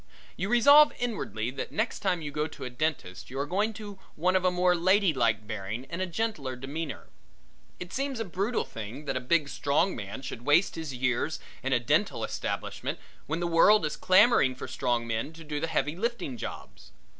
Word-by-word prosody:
You 195 Hz, -, -3 dB
resolve 285 Hz, +6 st, +7 dB
inwardly 195 Hz, -, -3 dB
that 135 Hz, -, -5 dB
next 220 Hz, +2 st, -1 dB
time 180 Hz, -4 st, 0 dB
you 145 Hz, -, -4 dB
go 150 Hz, +1 st, -1 dB
to -, -, -10 dB
a 125 Hz, -, -5 dB
dentist 125 Hz, -, -3 dB
you 130 Hz, -, -7 dB
are 140 Hz, -, 0 dB
going 205 Hz, +7 st, 0 dB
to 205 Hz, -2 st, -9 dB, 0.2 s
one 180 Hz, +4 st, +1 dB
of 185 Hz, -, +3 dB
a 185 Hz, -, +4 dB
more 180 Hz, 0 st, +3 dB
lady 185 Hz, +1 st, +3 dB
like 115 Hz, -4 st, +1 dB
bearing 110 Hz, +3 st, -5 dB
and 185 Hz, +1 st, -3 dB
gentler 165 Hz, -, -2 dB
demeanor. 140 Hz, +4 st, -6 dB, 0.7 s
It 180 Hz, -, -8 dB
seems 275 Hz, -2 st, -2 dB
a 225 Hz, -, -2 dB
brutal 200 Hz, +6 st, -1 dB
thing 115 Hz, +6 st, -8 dB
that 135 Hz, -2 st, -2 dB
a -, -, +1 dB
big 150 Hz, +3 st, +2 dB
strong 150 Hz, +7 st, +1 dB
man 100 Hz, +5 st, -7 dB
should 120 Hz, -, -6 dB
waste 145 Hz, +9 st, +3 dB
his 160 Hz, -3 st, -5 dB
years 125 Hz, +4 st, -1 dB, 0.2 s
in 135 Hz, +1 st, -2 dB
a 125 Hz, -, +4 dB
dental 120 Hz, -, +1 dB
establishment -, -, -3 dB, 0.3 s
when 160 Hz, +3 st, -2 dB
the -, -, 0 dB
world 170 Hz, +3 st, +5 dB
is 150 Hz, -, -2 dB
clamoring 185 Hz, -, +5 dB
for -, -, -7 dB
strong 120 Hz, -2 st, -1 dB
men 115 Hz, +7 st, -3 dB
to 165 Hz, 0 st, -11 dB
do 150 Hz, -1 st, -3 dB
the 165 Hz, -, -1 dB
heavy 150 Hz, -1 st, 0 dB
lifting 200 Hz, -, -2 dB
jobs. 115 Hz, -, -8 dB
160 Hz, 200 wpm, -28 LUFS, 130-190 Hz, 0.7 s, resolve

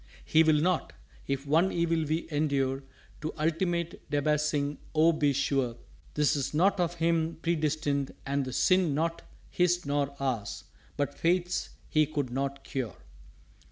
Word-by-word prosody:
_" -, -, -24 dB, 0.2 s
"He 160 Hz, -, +5 dB
will 155 Hz, -2 st, +4 dB
not. 175 Hz, +2 st, 0 dB, 0.3 s
If 140 Hz, 0 st, -2 dB
one 165 Hz, +6 st, +3 dB
evil 165 Hz, -2 st, +1 dB
we 155 Hz, +3 st, -1 dB
endure 140 Hz, -3 st, 0 dB, 0.4 s
To 155 Hz, -, -2 dB
ultimate 170 Hz, +2 st, -1 dB
Debasing, 150 Hz, 0 st, 0 dB, 0.2 s
oh, 160 Hz, +2 st, +6 dB
be 150 Hz, -2 st, +2 dB
sure 135 Hz, -3 st, 0 dB, 0.4 s
'Tis 150 Hz, -1 st, +1 dB
not 190 Hz, +5 st, +3 dB
of 175 Hz, -1 st, 0 dB
Him 165 Hz, -1 st, +1 dB
predestined, 155 Hz, -4 st, 0 dB
and 140 Hz, +1 st, 0 dB
the 130 Hz, -, -5 dB
sin 180 Hz, +2 st, +3 dB
Not 165 Hz, +2 st, -1 dB, 0.3 s
His 175 Hz, -1 st, +2 dB
nor 140 Hz, 0 st, -1 dB
ours 125 Hz, -7 st, -2 dB, 0.3 s
but 145 Hz, -1 st, -1 dB
Fate's 180 Hz, +1 st, +1 dB, 0.2 s
He 155 Hz, -1 st, +3 dB
could 145 Hz, -4 st, -2 dB
not 135 Hz, +1 st, -2 dB
cure." 130 Hz, -, -4 dB
150 Hz, 145 wpm, -29 LUFS, 140-165 Hz, 0.4 s, oh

